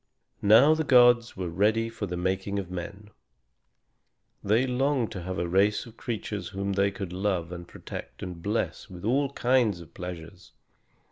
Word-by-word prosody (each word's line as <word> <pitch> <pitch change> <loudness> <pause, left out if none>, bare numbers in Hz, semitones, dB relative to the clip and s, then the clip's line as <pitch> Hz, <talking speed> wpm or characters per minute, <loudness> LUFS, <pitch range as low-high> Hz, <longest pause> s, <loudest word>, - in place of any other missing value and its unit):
Now 115 +9 +7
the 160 0 0
gods 120 -4 +5
were 90 -1 -3
ready 110 +5 +2
for 115 -2 -5
the 90 0 -4
making 95 +2 -1
of 95 -3 -4
men. 100 +4 -7 1.3
They 110 +6 +3
longed 130 -1 0
to 95 - -6
have 95 +1 -5
a 85 - -1
race 100 +4 +2
of 115 -2 -13
creatures 105 -5 -4
whom 100 0 -3
they 100 +1 +2
could 95 -2 -6
love 95 -3 -1
and 85 -1 -7
protect - - -9
and 90 -2 -7
bless 105 +4 -2
with 90 0 -9
all 135 +5 +2
kinds 120 -8 +2
of 85 - -13
pleasures. 90 +1 -9
100 Hz, 165 wpm, -27 LUFS, 90-115 Hz, 1.3 s, Now